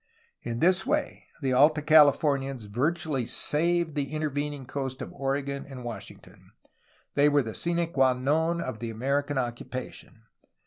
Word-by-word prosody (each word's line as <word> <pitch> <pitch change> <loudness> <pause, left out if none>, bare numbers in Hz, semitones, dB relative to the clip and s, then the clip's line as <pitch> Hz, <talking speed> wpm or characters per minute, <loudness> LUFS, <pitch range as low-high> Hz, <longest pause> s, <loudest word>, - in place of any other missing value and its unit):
In 115 -1 -4
this 185 +2 +4
way 300 +2 -2 0.2
the 130 -1 +1
Alta 150 +4 +4
Californians 140 -5 +4
virtually 140 +5 -1
saved 170 +6 +1
the 140 -2 -2
intervening 145 -2 -3
coast 130 0 -4
of - - -7
Oregon 140 0 -2
and 130 -2 -8
Wash 120 -2 -6
ington. - - -17 0.7
They 145 +1 +4
were 145 -1 +3
the 110 -2 -6
sine 170 +4 0
qua 130 -1 +4
non 160 +6 0
of 130 -7 -5
the 115 - -4
American 140 +5 -1
occupa 125 0 -4
tion. 110 - -14
140 Hz, 150 wpm, -27 LUFS, 130-155 Hz, 0.7 s, this